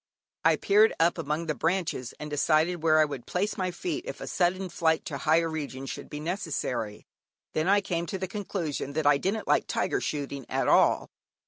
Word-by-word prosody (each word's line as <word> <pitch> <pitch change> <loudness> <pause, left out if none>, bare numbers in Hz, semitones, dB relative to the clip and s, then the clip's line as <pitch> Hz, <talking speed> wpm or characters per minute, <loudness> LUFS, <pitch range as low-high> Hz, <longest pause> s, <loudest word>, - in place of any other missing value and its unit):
I - - +5
peered 210 +2 +4
up 170 +1 +3
among 150 +4 -2
the 155 - 0
branches, 165 -7 -1
and 150 - -5
decided 155 +3 +2
where 155 -1 +4
I 155 - +6
would 140 -5 -7
place 200 +4 -1
my 185 -3 -1
feet 335 - -4
if - - -6
a - - -6
sudden 185 +1 0
flight 160 -1 +1
to 140 -4 -4
higher 160 +3 +3
regions 140 -4 -5
should - - -8
be 150 - -6
necessary. 150 - -3 0.5
Then 155 +2 0
I 200 +1 +5
came 170 -3 -2
to 190 - -3
the 190 0 -3
conclusion 180 -8 -4
that 155 0 -1
I 145 -1 +5
didn't 205 +6 -2
like - - +2
tiger - - 0
shooting 140 -3 -4
at - - 0
all. - - +4
160 Hz, 200 wpm, -28 LUFS, 150-185 Hz, 0.5 s, I